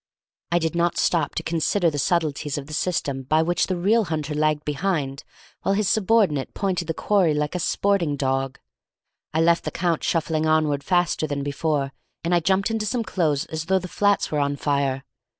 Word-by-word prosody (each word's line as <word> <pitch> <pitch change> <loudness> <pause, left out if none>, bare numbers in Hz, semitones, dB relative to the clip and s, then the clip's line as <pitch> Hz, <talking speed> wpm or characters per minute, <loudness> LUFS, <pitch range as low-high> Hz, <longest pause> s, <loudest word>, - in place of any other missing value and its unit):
I 170 - +3
did 160 -2 0
not 170 0 +1
stop 160 -5 +1
to - - -2
consider 170 +2 +1
the 145 - -3
subtleties 150 -2 0
of 140 - -5
the 155 - -9
system 145 -5 -1
by 155 +5 +2
which 175 +1 +1
the 185 - -1
real 210 +5 +3
hunter 155 -3 -3
lagged 150 0 0
behind 150 -3 -2 0.4
while 195 - +1
his 210 -1 +1
subordinate 195 - +2
pointed 185 -4 -1
the 165 - -2
quarry 185 -7 +2
like 150 0 -1
a 180 - -2
sporting 175 -3 +1
dog. 135 -1 -1 0.7
I 160 - +1
left 170 +1 +3
the - - -2
Count 170 -2 -1
shuffling 160 -1 0
onward 155 -3 +2
faster 175 -3 +1
than 140 -1 -3
before, 140 -1 -1 0.3
and 170 +1 0
I 175 - +5
jumped 190 +5 +1
into 220 -1 -1
some 235 +3 -1
clothes 160 -7 0
as 160 0 -5
though 190 +3 +2
the 185 0 -4
flats 205 +2 +1
were 150 - 0
on 140 0 0
fire. 140 -2 -1
160 Hz, 195 wpm, -23 LUFS, 145-180 Hz, 0.7 s, I